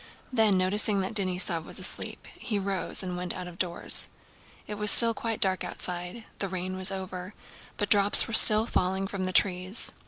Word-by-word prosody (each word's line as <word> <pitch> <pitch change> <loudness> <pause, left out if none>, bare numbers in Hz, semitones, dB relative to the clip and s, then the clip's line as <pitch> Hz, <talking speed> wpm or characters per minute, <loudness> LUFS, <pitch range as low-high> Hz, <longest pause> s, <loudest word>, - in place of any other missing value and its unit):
Then, 220 -5 +2
noticing 200 +2 0
that 190 +4 -4
Denísov 180 -4 0
was - - -5
asleep, - - -2
he 215 - -4
rose 195 -1 -3
and 180 -1 -5
went 180 0 -5
out 180 -1 -7
of 175 0 -13
doors. 175 -2 -1 0.6
It - - -7
was 210 0 0
still 230 +1 +8
quite 225 -1 -4
dark 190 -1 0
outside. 180 +5 -4 0.2
The 195 - -2
rain 185 0 -5
was 190 +1 -1
over, 185 0 -7 0.4
but 205 - -3
drops 205 -1 +4
were 230 - -8
still 215 0 +7
falling 190 -3 -1
from 195 -1 -5
the 185 - -3
trees. 185 +2 0
190 Hz, 185 wpm, -27 LUFS, 185-205 Hz, 0.6 s, still